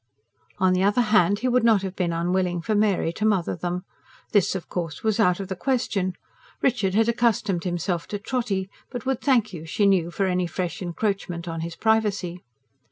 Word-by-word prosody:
On 185 -2 +3
the 185 - +1
other 205 +5 +3
hand, 200 -1 +5
he 255 - +1
would 250 -1 +3
not 220 -4 +4
have 190 -1 -4
been 175 -2 0
unwilling 175 +1 0
for 220 - 0
Mary 205 -5 +2
to 215 - -5
mother 200 -5 +1
them. 180 +1 -3 0.5
This, 200 -2 +3
of 185 - -5
course, 165 -5 -4
was 220 0 +1
out 180 -4 +3
of 195 - -4
the 190 - -4
question: 200 -5 0 0.5
Richard 215 -7 +1
had 225 +1 +4
accustomed 225 -6 +1
himself 175 -1 -2
to 205 - -3
Trotty, 205 -3 -2 0.2
but 245 -3 -6
would 265 -2 -1
thank 235 -7 +2
you, 160 -3 -7
she 165 +6 0
knew, 185 -4 +3
for 195 +3 -1
any 180 -1 0
fresh 175 +2 -4
encroachment 180 -1 -2
on 165 -1 -4
his 165 0 -5
privacy. 205 -5 0
190 Hz, 195 wpm, -24 LUFS, 175-220 Hz, 0.5 s, hand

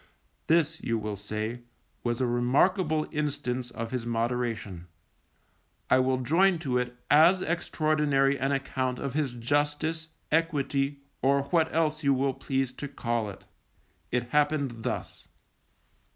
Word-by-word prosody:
_ - - -30 0.4
This, 160 -1 +2
you 115 - 0
will 105 -1 -3
say, 110 +4 -4 0.4
was 120 -1 -1
a 130 - +2
remarkable 155 +7 +2
instance 130 -5 -2
of 115 -1 -6
his 125 -2 -2
moderation. 115 -6 -2 1.0
I 130 - +6
will 130 0 +2
join 175 +8 +3
to 130 -6 0
it 125 0 -4
as 170 +5 +6
extraordinary 150 -4 +1
an 135 +1 0
account 130 -2 -1
of 140 -1 -4
his 140 -5 -1
justice, 145 +6 -1 0.2
equity, 145 -3 0 0.2
or 140 +1 +3
what 160 +2 +1
else 155 -1 0
you 140 -1 +4
will 135 +1 +1
please 135 -1 -2
to 145 - -6
call 120 -5 -2
it. 95 - -11 0.6
It 120 0 -1
happened 145 -4 +1
thus. 125 - -5
135 Hz, 135 wpm, -28 LUFS, 120-155 Hz, 1.0 s, I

